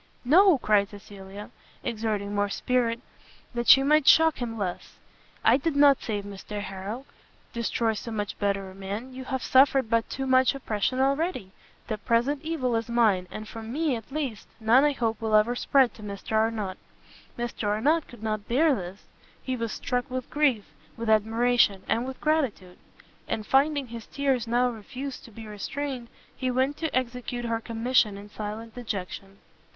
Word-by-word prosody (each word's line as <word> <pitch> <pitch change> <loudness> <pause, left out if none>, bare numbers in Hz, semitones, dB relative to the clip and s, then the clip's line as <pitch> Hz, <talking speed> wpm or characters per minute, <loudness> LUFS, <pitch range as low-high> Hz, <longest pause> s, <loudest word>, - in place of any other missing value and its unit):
"No," 355 +5 +6
cried 210 -4 +2
Cecilia, 200 0 -11 0.3
exerting 210 -3 -2
more 205 0 +1
spirit, 235 +1 0 0.5
that 240 0 -3
she 270 - +8
might 300 +1 +3
shock 320 -2 +6
him 230 -2 -4
less, 185 -4 -5 0.5
"I 230 +3 +6
did 290 +2 -2
not 285 -1 +6
save 205 -3 -3
Mr 205 +1 -7
Harrel, 200 +6 -6
to - - -31
destroy 230 0 0
so 220 - -6
much 205 -2 -4
better 195 -2 -1
a - - -13
man! 200 +7 -6
you 260 0 -7
have 260 -2 -3
suffered 265 -3 +4
but 230 -1 +2
too 270 - -3
much 260 +1 +4
oppression 250 -1 -1
already; 275 - 0 0.3
the 215 -2 -4
present 240 +7 +1
evil 290 -7 -1
is 225 +1 -4
mine; 215 -6 +2
and 215 +3 -7
from 225 +1 -8
me, 300 0 0
at 225 +2 -9
least, 270 -8 -4
none 230 +5 +5
I 295 - +3
hope 230 -4 -2
will 220 -1 +1
ever 220 +3 +4
spread 265 0 +3
to - - -14
Mr 200 -1 -7
Arnott." 220 -3 0 0.6
Mr 240 -3 -3
Arnott 285 +10 +2
could 235 -3 -13
not 215 -2 -2
bear 290 +5 +3
this; 190 -3 -6 0.4
he 260 - -2
was 230 -2 -3
struck 245 0 -2
with 255 -1 -5
grief, 275 -9 +2 0.3
with 230 -1 -1
admiration, 220 -2 +3
and 235 +3 0
with 265 - -7
gratitude, 265 - -1 0.5
and 215 - -3
finding 280 0 +2
his 230 -1 -8
tears 270 -5 0
now 245 +2 +2
refused 260 +4 -7
to 230 - -13
be 225 +1 -10
restrained, 250 +4 -5 0.3
he 255 - -2
went 260 +3 +1
to 320 -5 -1
execute 245 -1 -3
her 230 -1 -1
commission 230 -2 +1
in 205 +1 -11
silent 215 +2 -6
dejection. 195 -4 -6
235 Hz, 175 wpm, -27 LUFS, 210-265 Hz, 0.6 s, she